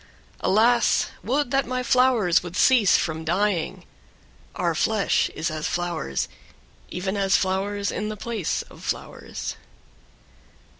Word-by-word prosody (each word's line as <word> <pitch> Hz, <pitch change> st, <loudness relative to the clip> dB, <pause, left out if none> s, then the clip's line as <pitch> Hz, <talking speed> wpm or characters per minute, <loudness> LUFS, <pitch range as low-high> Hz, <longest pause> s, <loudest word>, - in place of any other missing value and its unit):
8. -, -, -2 dB
Alas! 230 Hz, +3 st, +3 dB
would 260 Hz, +6 st, 0 dB
that 275 Hz, -2 st, +1 dB
my 255 Hz, 0 st, -2 dB
flowers 250 Hz, -9 st, +3 dB
would 175 Hz, -1 st, -8 dB
cease 235 Hz, -8 st, +5 dB
from 160 Hz, -1 st, -2 dB
dying; 180 Hz, +1 st, -1 dB, 0.7 s
our -, -, 0 dB
flesh -, -, +1 dB
is 160 Hz, -, -2 dB
as 155 Hz, 0 st, -3 dB
flowers, 175 Hz, -, -2 dB, 0.6 s
even 190 Hz, +2 st, -3 dB
as 195 Hz, -1 st, +3 dB
flowers 200 Hz, +2 st, -1 dB
in 210 Hz, -, -3 dB
the 215 Hz, -, -5 dB
place 220 Hz, -5 st, -2 dB
of -, -, -16 dB
flowers. -, -, -5 dB
200 Hz, 130 wpm, -24 LUFS, 175-235 Hz, 0.7 s, cease